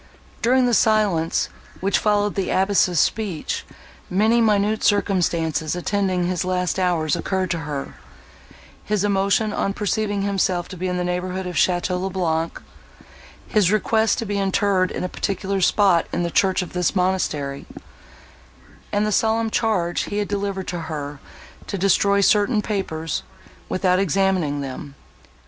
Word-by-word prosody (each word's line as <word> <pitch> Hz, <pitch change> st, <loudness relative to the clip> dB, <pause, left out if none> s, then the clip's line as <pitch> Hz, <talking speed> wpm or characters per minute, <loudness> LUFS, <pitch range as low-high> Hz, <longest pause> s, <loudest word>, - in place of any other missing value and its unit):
During 255 Hz, +2 st, +3 dB
the 245 Hz, -, +1 dB
silence, 210 Hz, -8 st, +2 dB, 0.3 s
which 195 Hz, +1 st, +1 dB
followed 205 Hz, -1 st, +1 dB
the 195 Hz, -, -2 dB
abbess' 190 Hz, -3 st, +2 dB
speech, 200 Hz, -6 st, -1 dB, 0.5 s
many 220 Hz, +5 st, +3 dB
minute 215 Hz, -1 st, +2 dB
circumstances 170 Hz, -6 st, +1 dB
attending 185 Hz, 0 st, 0 dB
his 180 Hz, 0 st, -1 dB
last 180 Hz, 0 st, -1 dB
hours 175 Hz, -3 st, +1 dB
occurred 185 Hz, +2 st, -2 dB
to 170 Hz, -, -1 dB
her—his 140 Hz, -, -7 dB
emotion 200 Hz, +1 st, +1 dB
on 195 Hz, -, -1 dB
perceiving 205 Hz, -1 st, -1 dB
himself 190 Hz, -3 st, 0 dB
to 185 Hz, -, -7 dB
be 185 Hz, +1 st, -3 dB
in 180 Hz, 0 st, -1 dB
the 180 Hz, -, -1 dB
neighbourhood 180 Hz, +1 st, -2 dB
of 180 Hz, -, -4 dB
Château 180 Hz, +2 st, +1 dB
le 190 Hz, -, -2 dB
Blanc—his 175 Hz, +2 st, -3 dB
request 220 Hz, +1 st, +2 dB
to 230 Hz, -, -3 dB
be 205 Hz, -1 st, -2 dB
interred 195 Hz, -1 st, +1 dB
in -, -, -4 dB
a -, -, 0 dB
particular 195 Hz, +1 st, -2 dB
spot 185 Hz, -2 st, +3 dB
in -, -, -1 dB
the 170 Hz, -, -2 dB
church 190 Hz, 0 st, +2 dB
of 180 Hz, -, -10 dB
this 180 Hz, +2 st, 0 dB
monastery—and 180 Hz, +3 st, -4 dB
the 215 Hz, -, 0 dB
solemn 225 Hz, +2 st, +1 dB
charge 185 Hz, -8 st, 0 dB
he 205 Hz, -, -4 dB
had 205 Hz, -1 st, -1 dB
delivered 200 Hz, -2 st, -3 dB
to 175 Hz, -, -3 dB
her 150 Hz, -3 st, -5 dB, 0.5 s
to 200 Hz, -, -3 dB
destroy 200 Hz, +1 st, +3 dB
certain 210 Hz, +2 st, +3 dB
papers, 165 Hz, -7 st, -3 dB, 0.5 s
without 185 Hz, -1 st, +2 dB
examining 185 Hz, -6 st, +1 dB
them. 140 Hz, +1 st, -7 dB
190 Hz, 140 wpm, -22 LUFS, 175-205 Hz, 0.5 s, During